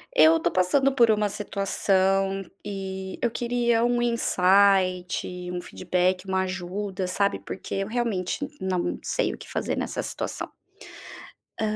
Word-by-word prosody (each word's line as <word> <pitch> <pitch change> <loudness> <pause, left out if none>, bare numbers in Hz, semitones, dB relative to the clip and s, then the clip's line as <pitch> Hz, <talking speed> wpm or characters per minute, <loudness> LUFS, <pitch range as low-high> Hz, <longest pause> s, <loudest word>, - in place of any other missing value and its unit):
Eh, 155 - +7
eu 165 +1 +6
tô 170 - +1
passando 265 +10 +3
por 235 -4 +5
uma 210 -1 +1
situação 195 -1 +1 0.2
e 190 -1 -5
eu 240 - +2
queria 235 0 +1
um 240 0 +2
insight, 185 -5 +2
um 180 0 -3
feedback, 180 +1 -1
uma 190 0 +1
ajuda, 190 +1 -3
sabe, 200 +2 0
porque, 195 +1 -4
realmente, 220 -5 -1 0.2
não 185 -2 -1
sei - - 0
o - - -8
que - - -12
fazer - - -2
nessa - - -2
situação. - - -4 1.1
Hã. 215 -1 -1
195 Hz, 140 wpm, -25 LUFS, 185-215 Hz, 1.1 s, Eh